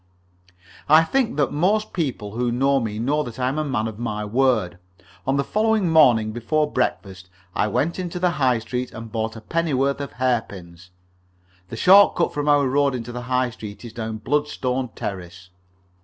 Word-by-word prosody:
I 155 Hz, +2 st, +7 dB
think 235 Hz, -, 0 dB
that 140 Hz, -4 st, +1 dB
most 205 Hz, +8 st, +1 dB
people 130 Hz, -, -3 dB
who 120 Hz, +2 st, -1 dB
know 135 Hz, +3 st, +2 dB
me 110 Hz, -4 st, -4 dB
know 140 Hz, +7 st, 0 dB
that 120 Hz, -6 st, -7 dB
I 125 Hz, -1 st, 0 dB
am 145 Hz, +4 st, -2 dB
a -, -, 0 dB
man 120 Hz, -7 st, -1 dB
of 110 Hz, -1 st, -8 dB
my 105 Hz, -3 st, -3 dB
word. 110 Hz, -6 st, +1 dB, 0.5 s
On 135 Hz, +1 st, +2 dB
the 140 Hz, -, +1 dB
following 215 Hz, -1 st, +1 dB
morning, 120 Hz, -9 st, +5 dB
before 150 Hz, +7 st, -1 dB
breakfast, 95 Hz, -7 st, -3 dB, 0.2 s
I 105 Hz, -, +1 dB
went 160 Hz, -, -1 dB
into 180 Hz, -1 st, -4 dB
the 180 Hz, 0 st, +1 dB
High 130 Hz, -7 st, +2 dB
Street 125 Hz, +3 st, -4 dB
to 110 Hz, -, -9 dB
buy 110 Hz, 0 st, -3 dB
a 110 Hz, -, -9 dB
pennyworth 140 Hz, -1 st, 0 dB
of 140 Hz, -, -6 dB
hairpins. 95 Hz, -8 st, -3 dB, 0.8 s
The 115 Hz, -, -7 dB
short 195 Hz, +7 st, +6 dB
cut 170 Hz, -, 0 dB
from 145 Hz, 0 st, -1 dB
our 145 Hz, -2 st, +4 dB
road 140 Hz, 0 st, +1 dB
into 120 Hz, -1 st, -6 dB
the 125 Hz, 0 st, -6 dB
High 125 Hz, -1 st, +1 dB
Street 105 Hz, 0 st, -10 dB
is 115 Hz, -, -9 dB
down 110 Hz, -1 st, -5 dB
Bloodstone 130 Hz, 0 st, -1 dB
Terrace. 90 Hz, -2 st, -7 dB
125 Hz, 185 wpm, -22 LUFS, 110-150 Hz, 0.8 s, I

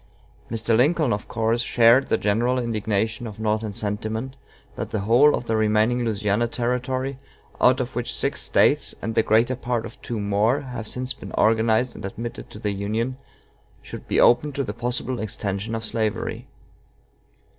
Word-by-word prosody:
Mr. 115 Hz, 0 st, 0 dB
Lincoln, 145 Hz, +2 st, +3 dB
of 105 Hz, -, -4 dB
course, 115 Hz, +1 st, 0 dB
shared 120 Hz, +3 st, +4 dB
the -, -, +2 dB
general 120 Hz, +5 st, +1 dB
indignation 110 Hz, -1 st, -1 dB
of 110 Hz, 0 st, -9 dB
Northern 110 Hz, 0 st, -1 dB
sentiment 110 Hz, +4 st, -3 dB, 0.4 s
that -, -, -4 dB
the 110 Hz, -, -2 dB
whole 120 Hz, +8 st, +5 dB
of -, -, -5 dB
the 110 Hz, -, 0 dB
remaining 110 Hz, +3 st, +2 dB
Louisiana 105 Hz, 0 st, 0 dB
Territory, 125 Hz, +3 st, -2 dB, 0.4 s
out 125 Hz, +1 st, +5 dB
of 125 Hz, -2 st, -3 dB
which 120 Hz, 0 st, -2 dB
six -, -, -1 dB
States, -, -, +2 dB
and 115 Hz, -, -3 dB
the 115 Hz, -, +4 dB
greater 115 Hz, +3 st, +2 dB
part 120 Hz, -2 st, -2 dB
of -, -, -10 dB
two 115 Hz, -2 st, -4 dB
more, 105 Hz, +5 st, +1 dB
have 120 Hz, -5 st, -6 dB
since 125 Hz, +2 st, -2 dB
been -, -, -10 dB
organized 110 Hz, +2 st, +2 dB
and -, -, -10 dB
admitted 115 Hz, +4 st, -6 dB
to -, -, -11 dB
the 105 Hz, -1 st, -2 dB
Union, 110 Hz, +6 st, -2 dB, 0.7 s
should -, -, -9 dB
be -, -, +1 dB
opened 135 Hz, +4 st, +4 dB
to 140 Hz, -, 0 dB
the 105 Hz, -, -4 dB
possible 120 Hz, +1 st, -2 dB
extension 105 Hz, 0 st, -3 dB
of 110 Hz, 0 st, -4 dB
slavery. 110 Hz, -1 st, -2 dB
115 Hz, 165 wpm, -23 LUFS, 110-125 Hz, 0.7 s, whole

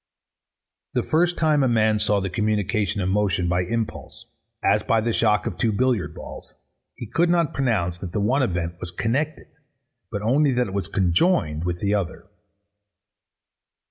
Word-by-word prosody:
The -, -, +1 dB
first 175 Hz, +2 st, +1 dB
time 155 Hz, -3 st, +3 dB
a 135 Hz, -, +3 dB
man 110 Hz, -2 st, +2 dB
saw 105 Hz, -1 st, +2 dB
the 95 Hz, 0 st, -3 dB
communication 105 Hz, +1 st, 0 dB
of 90 Hz, -, -1 dB
motion 95 Hz, -3 st, +1 dB
by 90 Hz, +1 st, +1 dB
impulse, 110 Hz, +4 st, -4 dB, 0.4 s
as -, -, +3 dB
by 115 Hz, -, +2 dB
the 115 Hz, +1 st, -1 dB
shock 105 Hz, -2 st, +2 dB
of -, -, -4 dB
two 115 Hz, -, +2 dB
billiard 120 Hz, -2 st, 0 dB
balls, -, -, -10 dB, 0.4 s
he -, -, -7 dB
could 165 Hz, +10 st, +1 dB
not 170 Hz, -3 st, +2 dB
pronounce 100 Hz, -10 st, 0 dB
that 90 Hz, -2 st, -6 dB
the 105 Hz, -, -2 dB
one 125 Hz, +8 st, +2 dB
event 85 Hz, -7 st, -2 dB
was 90 Hz, -, -6 dB
connected: 130 Hz, -, -2 dB, 0.6 s
but 105 Hz, -2 st, -4 dB
only 135 Hz, +5 st, +3 dB
that 125 Hz, 0 st, +1 dB
it 95 Hz, -, -7 dB
was 100 Hz, -1 st, -2 dB
conjoined 85 Hz, -, +1 dB
with 85 Hz, -1 st, -3 dB
the 100 Hz, 0 st, +1 dB
other. 100 Hz, -5 st, -2 dB
105 Hz, 170 wpm, -23 LUFS, 95-125 Hz, 0.6 s, time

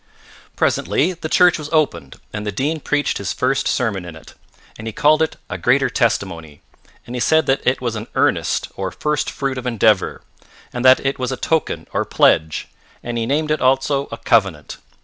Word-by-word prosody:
Presently 175 Hz, +6 st, +1 dB
the 165 Hz, -2 st, -6 dB
church 180 Hz, -1 st, +4 dB
was 150 Hz, -1 st, -7 dB
opened 85 Hz, -, -1 dB
and 105 Hz, -1 st, -4 dB
the 105 Hz, -, -3 dB
Dean 145 Hz, +10 st, -1 dB
preached 145 Hz, 0 st, -1 dB
his 100 Hz, -, -3 dB
first 130 Hz, +1 st, 0 dB
sermon 110 Hz, -7 st, -1 dB
in 85 Hz, -2 st, -9 dB
it, 80 Hz, -, -14 dB, 0.4 s
and 110 Hz, -, -8 dB
he 110 Hz, -, -4 dB
called 155 Hz, +5 st, +3 dB
it 160 Hz, -, 0 dB
a 95 Hz, -, -5 dB
Greater 130 Hz, +9 st, +2 dB
Testimony, 95 Hz, -, -2 dB, 0.4 s
and 120 Hz, -, -7 dB
he -, -, -2 dB
said 160 Hz, +4 st, +3 dB
that 135 Hz, +1 st, +1 dB
it 130 Hz, +1 st, +2 dB
was 120 Hz, -3 st, -2 dB
an 110 Hz, +1 st, -6 dB
earnest, -, -, +1 dB
or 95 Hz, -1 st, -3 dB
first 150 Hz, +9 st, -2 dB
fruit 135 Hz, -2 st, -3 dB
of 125 Hz, -, -6 dB
endeavour, 110 Hz, -5 st, +1 dB, 0.5 s
and 125 Hz, -, -3 dB
that 130 Hz, +1 st, +6 dB
it 135 Hz, 0 st, -1 dB
was 130 Hz, 0 st, -2 dB
a 130 Hz, -, -3 dB
token 160 Hz, -1 st, -1 dB
or -, -, +1 dB
pledge, 80 Hz, -1 st, +2 dB, 0.4 s
and 120 Hz, 0 st, -4 dB
he 115 Hz, -, -2 dB
named 150 Hz, +3 st, 0 dB
it 155 Hz, -, 0 dB
also 135 Hz, +2 st, +1 dB
a 115 Hz, -, -5 dB
covenant. 100 Hz, -12 st, 0 dB
125 Hz, 195 wpm, -19 LUFS, 105-145 Hz, 0.5 s, that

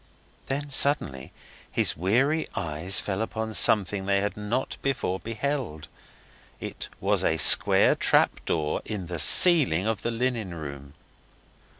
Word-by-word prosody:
Then 140 Hz, +1 st, -5 dB
suddenly 135 Hz, -, -1 dB, 0.4 s
his -, -, 0 dB
weary 130 Hz, -, 0 dB
eyes 85 Hz, +4 st, -2 dB
fell 100 Hz, +1 st, -4 dB
upon 110 Hz, 0 st, -5 dB
something 100 Hz, -2 st, +2 dB
they 100 Hz, 0 st, +1 dB
had 105 Hz, +1 st, -4 dB
not 105 Hz, +5 st, -4 dB
before 120 Hz, -9 st, -3 dB
beheld. 115 Hz, -, -5 dB, 0.7 s
It -, -, -8 dB
was -, -, 0 dB
a 80 Hz, -, 0 dB
square -, -, +6 dB
trap -, -, +1 dB
door 75 Hz, -2 st, -2 dB
in 105 Hz, -4 st, -6 dB
the 85 Hz, -1 st, -7 dB
ceiling 145 Hz, -, +5 dB
of 110 Hz, -2 st, -3 dB
the -, -, -3 dB
linen 115 Hz, -6 st, -3 dB
room. 70 Hz, -2 st, -10 dB
105 Hz, 130 wpm, -25 LUFS, 85-125 Hz, 0.7 s, square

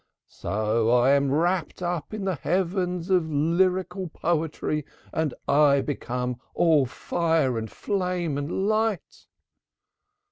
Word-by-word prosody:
So 110 Hz, +3 st, +1 dB
am 140 Hz, 0 st, +3 dB
I -, -, +2 dB
rapt 175 Hz, +1 st, 0 dB
up 175 Hz, -3 st, -3 dB
into 215 Hz, -2 st, -4 dB
the -, -, -2 dB
heaven 180 Hz, +2 st, -1 dB
of 170 Hz, -3 st, +2 dB
lyrical 180 Hz, +5 st, +1 dB
poetry 155 Hz, -2 st, -1 dB, 0.3 s
and 160 Hz, -3 st, 0 dB, 0.2 s
I 140 Hz, -1 st, +4 dB
become 125 Hz, -3 st, -3 dB, 0.2 s
all 155 Hz, -6 st, +4 dB
fire 160 Hz, -1 st, 0 dB
and 110 Hz, -1 st, -3 dB
flame 180 Hz, -6 st, -2 dB
and 150 Hz, +7 st, -2 dB
light." 215 Hz, -3 st, -1 dB
160 Hz, 115 wpm, -25 LUFS, 140-180 Hz, 0.3 s, I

